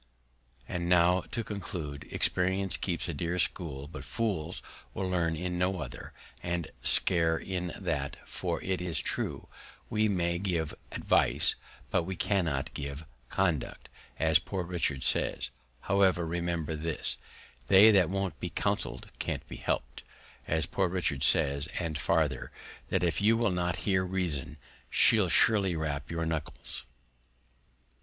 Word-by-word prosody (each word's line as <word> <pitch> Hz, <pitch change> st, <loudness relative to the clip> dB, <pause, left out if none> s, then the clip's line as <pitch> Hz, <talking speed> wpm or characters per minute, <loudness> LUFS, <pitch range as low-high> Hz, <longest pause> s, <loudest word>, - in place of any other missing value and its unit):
And 85 Hz, 0 st, -2 dB
now 90 Hz, +1 st, +5 dB
to 115 Hz, 0 st, -3 dB
conclude, 80 Hz, -8 st, -5 dB
Experience 95 Hz, -1 st, +1 dB
keeps 85 Hz, 0 st, -2 dB
a 85 Hz, -, -2 dB
dear 85 Hz, +4 st, -2 dB
School, 80 Hz, -5 st, -1 dB
but 80 Hz, -, -8 dB
Fools 95 Hz, -8 st, -2 dB, 0.3 s
will 95 Hz, -, -1 dB
learn 85 Hz, -3 st, +1 dB
in 90 Hz, +2 st, -3 dB
no 90 Hz, +1 st, +1 dB
other, 65 Hz, -6 st, -7 dB, 0.3 s
and 85 Hz, -2 st, -3 dB
scarce 80 Hz, +5 st, +4 dB
in 90 Hz, -2 st, -2 dB
that; 75 Hz, -7 st, -2 dB
for -, -, -3 dB
it 95 Hz, -1 st, -1 dB
is 85 Hz, -5 st, -1 dB
true, -, -, -2 dB, 0.4 s
we 110 Hz, 0 st, +2 dB
may 85 Hz, -3 st, 0 dB
give 85 Hz, -5 st, -1 dB, 0.2 s
Advice, -, -, +3 dB, 0.4 s
but -, -, +3 dB
we 95 Hz, +3 st, -4 dB
cannot 85 Hz, -9 st, 0 dB
give 70 Hz, +2 st, -5 dB, 0.2 s
Conduct, 85 Hz, -8 st, -1 dB, 0.3 s
as 80 Hz, +2 st, +4 dB
Poor 95 Hz, 0 st, -4 dB
Richard 85 Hz, -6 st, -1 dB
says: -, -, 0 dB, 0.3 s
However, 95 Hz, -3 st, +3 dB
remember 85 Hz, -2 st, -2 dB
this, 80 Hz, +1 st, 0 dB, 0.5 s
They 105 Hz, +4 st, +8 dB
that 95 Hz, -6 st, +4 dB
won't 95 Hz, -2 st, -2 dB
be -, -, -3 dB
counseled, -, -, -2 dB
can't -, -, -3 dB
be -, -, -8 dB
helped, -, -, -2 dB, 0.5 s
as 80 Hz, -1 st, +1 dB
Poor 95 Hz, +2 st, 0 dB
Richard 85 Hz, -6 st, -1 dB
says: 70 Hz, -3 st, +3 dB
and 85 Hz, -3 st, -2 dB
farther, -, -, +1 dB, 0.4 s
That -, -, +1 dB
if 85 Hz, +1 st, +1 dB
you 110 Hz, +2 st, +5 dB
will 115 Hz, -3 st, +2 dB
not 90 Hz, -1 st, 0 dB
hear 95 Hz, -2 st, +3 dB
Reason, 85 Hz, -6 st, -2 dB, 0.3 s
she'll 105 Hz, -5 st, +5 dB
surely 100 Hz, -2 st, +4 dB
rap 75 Hz, -2 st, -3 dB
your 80 Hz, 0 st, -2 dB
Knuckles. 80 Hz, -2 st, -4 dB
85 Hz, 140 wpm, -30 LUFS, 80-95 Hz, 0.5 s, They